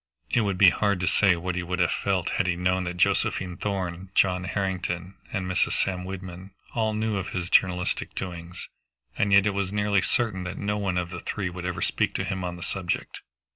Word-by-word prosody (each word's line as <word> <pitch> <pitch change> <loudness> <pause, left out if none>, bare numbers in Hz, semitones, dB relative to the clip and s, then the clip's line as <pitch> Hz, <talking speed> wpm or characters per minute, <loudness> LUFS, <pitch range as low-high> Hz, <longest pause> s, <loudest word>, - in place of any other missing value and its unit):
It 120 - +4
would 100 -3 0
be 90 -1 +8
hard 100 -3 +1
to - - +1
say 100 -3 +4
what 90 +2 -3
he 90 - -1
would 90 +1 -3
have 90 -1 +3
felt 95 -3 0
had 95 - +1
he 90 - +2
known 90 +1 +1
that 90 0 -4
Josephine 90 0 +1
Thorn, 95 -2 -3
John 90 -1 +3
Harrington, 90 -2 -2 0.2
and 95 - -2
Mrs. 90 0 +1
Sam 90 -2 0
Wyndham 95 0 -8 0.2
all 110 -2 +1
knew 110 -1 0
of 95 0 -3
his 90 -1 -3
journalistic 90 -1 +2
doings. 90 -1 -6 0.5
And 105 - +1
yet 100 0 +7
it 105 - +3
was 100 -1 -1
nearly 105 -1 +2
certain 110 -5 0
that 90 +1 -5
no 105 0 -1
one 95 -3 0
of 90 -1 -2
the 85 - -5
three 95 +1 -3
would 90 0 -6
ever 90 - -2
speak - - 0
to - - 0
him 95 -1 -3
on 90 -1 -3
the 85 - -8
subject. 90 -3 -3
95 Hz, 215 wpm, -26 LUFS, 90-100 Hz, 0.5 s, be